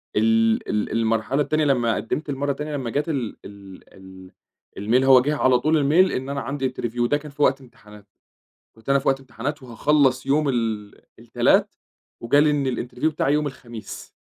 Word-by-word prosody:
ال 115 +1 +2
ال 105 0 -1
المرحلة 115 +4 0
التانية 155 +2 0
لمّا 120 -5 +1
قدمت 150 +6 -4
المرة 140 +1 -1
التانية 150 +2 -5
لمّا 130 -4 -4
جات 145 +7 -2
ال 130 -8 -3
ال 100 -2 -12
ال 95 -1 -14 0.5
الmail 115 +6 +2
هو 130 -1 +7
جيه 145 +4 -1
على 130 -3 +3
طول 155 +4 0
الmail، 155 +6 +3
إن 130 +2 -4
أنا 140 0 -3
عندي 135 -1 -3
interview 120 -1 -3
ده 145 - +1
كان 150 -1 -11
في 145 - -9
وقت 135 -1 +3
امتحانات، 105 -5 -17 0.7
كنت 110 +3 -12
أنا 140 0 +4
في - - -6
وقت 135 0 +2
امتحانات 135 +2 -6
وهاخلص 130 +2 +1
يوم 145 +1 +1
ال 110 -4 -2 0.2
التلات، - - +1 0.5
وجالي 145 +6 +3
إن 145 -2 0
الinterview 125 +4 -5
بتاعي 145 -3 +1
يوم 150 0 +1
الخميس. 120 -5 -10
130 Hz, 180 wpm, -22 LUFS, 115-145 Hz, 0.7 s, هو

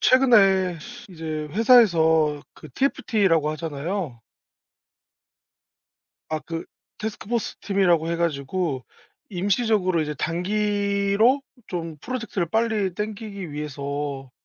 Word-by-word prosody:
최근에 195 -9 +5 0.3
이제 160 -4 -5
회사에서 165 - +4
그 - - -12
TFT라고 195 - +1
하잖아요. 155 - -4 2.1
아 155 - -1
그 165 +2 -6 0.3
태스크 215 -1 -5
포스 235 -1 -2
팀이라고 180 -5 +2
해 170 - 0
가지고 155 -3 -1 0.5
임시적으로 195 -2 +1
이제 150 0 -3
단기로 200 - +1 0.3
좀 165 -3 -4
프로젝트를 225 - -3
빨리 220 -4 +1
땡기기 210 -4 -5
위해서 140 -2 -4
180 Hz, 240 characters per minute, -24 LUFS, 155-210 Hz, 2.1 s, 최근에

